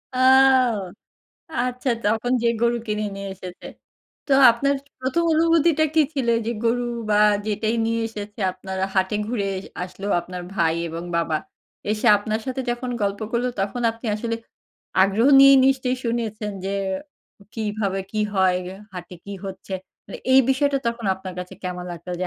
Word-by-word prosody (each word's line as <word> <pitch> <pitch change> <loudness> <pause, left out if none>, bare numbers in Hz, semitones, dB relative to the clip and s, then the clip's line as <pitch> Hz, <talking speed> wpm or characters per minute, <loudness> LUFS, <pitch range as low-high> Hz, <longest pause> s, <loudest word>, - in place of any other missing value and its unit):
আও! 260 -2 +5 0.9
আচ্ছা। 250 +1 -2 0.2
তখন 225 +4 +1
যেয়ে 235 0 +2
গরু 235 0 +3
কিনে 210 0 -1
নিয়ে 195 0 -5
এসেছে। 180 -1 -10 0.6
তো 280 - 0 0.2
আপনার 275 +5 +1
য - - -25
১ম 260 +6 0
অনুভূতিটা 325 -1 +3
কি 320 - +5
ছিল? 260 -4 -1 0.2
যে - - 0
গরু 240 +1 +2 0.3
বা 210 - +4 0.3
যেটাই 215 +2 0
নিয়ে 230 0 0
এসেছে 210 -1 -8
আপনার 190 +1 -7 0.2
হাটে 190 +2 +1
ঘুরে 220 -3 -2
এজ 190 - -6 0.2
আসলো 190 +2 -7
আপনার 180 +1 -7
ভাই 165 -4 +2
এবং 165 +1 -5
বাবা। 165 -2 +1 0.5
এসে 215 +2 -1
আপনার 215 +2 -2
সাথে 260 0 -2
যখন 245 +1 -3
গল্প 200 +1 -1
করলো 245 +1 +1
তখন 205 +5 -2
আপনি 230 +1 -9
আসলে 230 +2 -2 0.7
আগ্রহ 200 +6 +3
নিয়েই 275 0 +9
নিশ্চয়ই 260 -1 +1
শুনেছেন। 225 -3 -2
যে 195 - -2 0.8
কিভাবে 210 -3 -2
কি 215 - -3 0.2
হয়, 185 -1 +3
গে 185 - -6 0.2
হাটে 180 0 -8
কি 200 - -7
হচ্ছে? 190 0 -8 0.3
মানে 195 - -8
এই 265 - +8
বিষয়টা 275 +1 +2
তখন 235 -2 -2
আপনার 190 -1 -8
কাছে 180 0 -7
কেমন 180 -1 -4
লাগতো? 170 +1 -9
যে 185 - 0
220 Hz, 160 wpm, -23 LUFS, 195-250 Hz, 0.9 s, নিয়েই